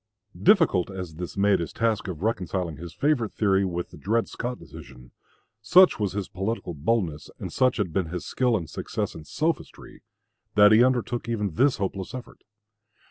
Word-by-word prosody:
Difficult 165 - +4
as 90 -5 -7
this 90 +2 -6
made 100 0 +3
his 85 -3 -4
task 110 -3 0
of 90 -2 -6
reconciling 95 -7 -2
his 85 +2 -8
favorite 140 - 0
theory 100 -2 +2
with 90 -2 -3
the - - -12
Dred 115 +4 0
Scott 125 +1 -4
decision, 60 -1 -13 0.5
such 180 - +6
was 100 -3 -1
his 100 -2 -3
political 95 -1 -3
boldness, 80 -2 -1
and - - -7
such 130 -1 +2
had 95 -7 -2
been 95 -2 0
his 90 +1 -5
skill 125 -3 +1
and 85 -5 -6
success - - -4
in 80 - -10
sophistry, 160 - -3 0.5
that 105 0 +7
he 110 +2 +7
undertook 120 -2 0
even 105 -4 -1
this 130 - +3
hopeless 95 +2 -4
effort. 125 - -10
100 Hz, 175 wpm, -25 LUFS, 90-115 Hz, 0.5 s, that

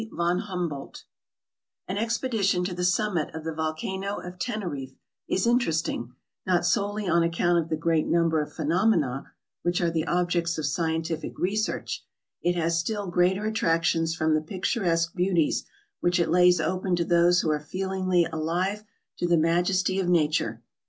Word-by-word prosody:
VON 175 +1 0
HUMBOLDT 175 -8 -5 0.8
AN 190 +2 -2
expedition 225 -5 0
to 180 0 -2
the 180 0 -3
summit 180 -2 +1
of 160 - -6
the 160 0 -3
volcano 175 +6 -3
of 180 0 -8
Teneriffe 170 - -4 0.3
is 190 - 0
interesting, 165 - 0 0.3
not 180 -2 +1
solely 205 0 0
on 170 0 +3
account 170 +1 +2
of 165 0 -3
the - - +1
great 160 -1 +1
num 170 0 +3
ber 160 -1 +1
of 150 0 -6
phenomena 160 - +1 0.4
which 175 0 0
are 170 -1 +1
the 160 -1 -1
objects 175 -1 0
of 155 - -2
scientific 160 +1 -2
re 190 +3 0
search; 215 0 -2 0.4
it 175 0 +1
has 165 -1 +1
still 205 +1 -2
greater 185 +4 +2
attractions 165 -5 +1
from 160 -1 +1
the 155 - +2
picturesque 170 -1 0
beauties 180 -3 +1 0.3
which 175 +1 +1
it 170 -2 +1
lays 180 0 +5
open 180 +3 0
to 170 -1 0
those 175 +1 +4
who 155 - 0
are 150 - 0
feelingly 185 +2 0
alive 175 +6 -2 0.3
to 175 - -1
the 175 -1 +4
majesty 180 +4 +2
of 180 -2 0
nature. 150 -9 +1
175 Hz, 165 wpm, -26 LUFS, 160-185 Hz, 0.8 s, lays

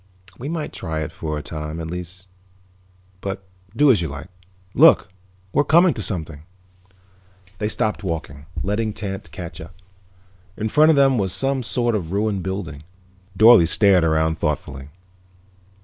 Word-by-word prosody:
"We 135 +4 -5
might 160 -2 -4
try 80 -1 -4
it 75 - -4
for 75 -1 -4
a 75 - -6
time, 75 0 -6
at 80 - -5
least. 90 +2 -7 0.9
But 95 0 -5 0.3
do 145 +3 +5
as 105 -8 +2
you 85 - -2
like. 75 +5 -8 0.4
Look, - - +6 0.4
we're 145 - +3
coming 170 +3 +4
to 110 - -6
something." 80 -7 -3 1.2
They 105 - -1
stopped 110 -1 -2
walking, 75 -5 -5 0.2
letting 105 +2 -1
Tance 100 +1 -6
catch 85 -3 -8
up. 80 +1 -12 0.8
In 110 - -2
front 155 +6 +5
of 160 - +5
them 135 -3 +4
was 95 -3 -1
some 135 0 0
sort 120 0 0
of 90 -6 -3
a - - -2
ruined 105 -2 0
building. 90 -6 -5 0.6
Dorle 110 -5 +7
stared 95 0 +4
around 80 0 +1
thoughtfully. 70 -3 -3
95 Hz, 155 wpm, -21 LUFS, 80-110 Hz, 1.2 s, Dorle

